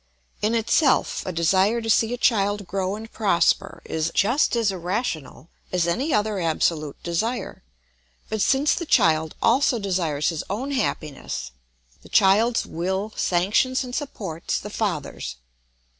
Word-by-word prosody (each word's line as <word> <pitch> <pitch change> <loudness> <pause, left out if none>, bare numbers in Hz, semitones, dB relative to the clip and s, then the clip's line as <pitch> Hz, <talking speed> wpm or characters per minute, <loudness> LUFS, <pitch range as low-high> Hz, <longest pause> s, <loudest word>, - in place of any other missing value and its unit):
In 215 +2 +1
itself, 255 +5 +2
a - - -1
desire 190 +7 +2
to 225 - -6
see 225 +1 +3
a 245 - -2
child 205 -4 +1
grow 190 +1 -2
and 225 +1 -9
prosper 200 -6 +1
is 160 +1 -2
just 240 +6 +2
as 225 -4 +2
irrational 180 - -4 0.2
as 180 -2 +1
any 260 - 0
other 210 -3 +1
absolute 160 -3 0
desire; 220 +9 -2 0.7
but 220 -1 -2
since 275 +7 +3
the 340 - -4
child 160 - +3
also 250 +1 +3
desires 175 -8 0
his 165 -3 -3
own 245 +9 -3
happiness, 155 - -3 0.5
the - - -16
child's 215 +5 +4
will 190 +5 -3
sanctions 205 +9 +1
and 250 -1 -8
supports 200 - -3
the - - -8
father's. 65 - -3
200 Hz, 140 wpm, -24 LUFS, 170-235 Hz, 0.7 s, child's